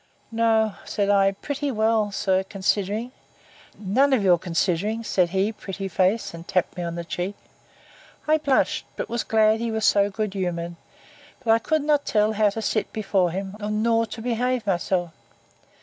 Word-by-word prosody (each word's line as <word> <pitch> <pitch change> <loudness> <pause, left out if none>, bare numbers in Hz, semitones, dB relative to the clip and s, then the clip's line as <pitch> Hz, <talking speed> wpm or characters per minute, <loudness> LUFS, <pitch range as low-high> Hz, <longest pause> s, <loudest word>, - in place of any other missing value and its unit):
No, 225 -2 +2
said 205 -1 0
I, 195 -1 +4
pretty 285 +7 -4
well, 220 -3 +1
sir, 190 -1 +1
considering. 205 +4 -1 0.7
None 250 +8 +2
of 235 -6 +2
your 180 -3 +4
considerings, 185 +6 -1
said 180 -2 +2
he, 195 +4 +1
pretty 195 -2 -6
face; 190 +4 0
and 165 0 -10
tapped 185 - 0
me 180 - -4
on 170 -1 -3
the 170 - -4
cheek. 180 +3 -3 0.9
I 310 +1 +4
blushed, 280 -3 +1
but - - -4
was 235 0 -1
glad 220 0 +3
he 235 0 -2
was 220 -1 -1
so 200 0 +4
good 210 0 -3
humoured; 175 -3 -3 0.7
but 225 - +2
I 225 - +5
could 310 +5 0
not 295 -1 +2
tell 215 0 +2
how 215 -1 +3
to 220 +2 -5
sit 215 - -1
before 195 -4 +1
him, 190 +3 -5
nor 225 +2 +1
to 220 +1 -8
behave 245 0 0
myself. 180 -2 0
210 Hz, 170 wpm, -24 LUFS, 190-225 Hz, 0.9 s, I